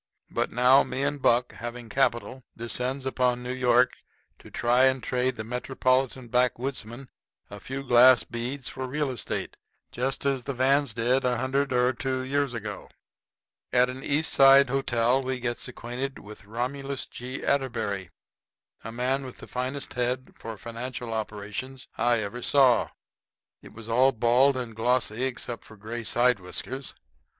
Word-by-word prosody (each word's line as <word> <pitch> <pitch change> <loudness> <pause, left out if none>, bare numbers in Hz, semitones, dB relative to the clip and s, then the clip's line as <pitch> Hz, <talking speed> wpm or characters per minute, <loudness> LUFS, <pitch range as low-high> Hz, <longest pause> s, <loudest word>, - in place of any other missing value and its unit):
But - - -1
now, 125 +3 +6
me 130 +2 -3
and 145 0 -1
Buck, 120 0 +2
having 120 0 -7
capital, 130 +1 0
descends 125 +4 -2
upon 125 -2 0
New 125 +1 -3
York 125 -1 +3 0.5
to - - -14
try 120 +2 +3
and 130 -2 +2
trade 125 +1 0
the 110 - -5
metropolitan 130 +1 0
backwoodsmen 125 0 -1 0.4
a 105 - -8
few 135 +6 -6
glass 125 -4 +6
beads 120 +7 -5
for 130 0 -4
real 145 +1 -1
estate 125 - -4 0.3
just 130 +3 -2
as 135 -3 0
the 140 - -3
Vans 135 -1 +2
did 125 +3 +1
a 125 -1 +1
hundred 135 +3 0
or 125 0 +3
two 130 0 -2
years 140 -1 -1
ago. 105 -3 -6 0.8
At 125 0 +3
an 130 +1 -9
East 150 +3 +1
Side 135 -1 +7
hotel 125 -1 +2
we 130 -1 -3
gets 120 -1 -3
acquainted 125 +2 -5
with 105 0 -12
Romulus 130 +5 -3
G. 125 +2 -7
Atterbury, 115 -9 -1 0.7
a 115 - -6
man 130 +3 -1
with 130 -2 -9
the - - -10
finest 130 +3 -4
head 125 +1 -2
for 115 -1 -8
financial 120 +2 -6
operations 110 +4 -5
I 120 -2 +2
ever 110 +4 -5
saw. 130 -4 +4 0.7
It - - -13
was 115 0 -11
all 125 +4 +4
bald 125 +4 +4
and 120 -3 -5
glossy 120 +1 +1
except 120 -2 -3
for 110 - -15
gray 115 +3 -6
side 120 0 +3
whiskers. 130 +9 -5
125 Hz, 155 wpm, -27 LUFS, 120-130 Hz, 0.8 s, Side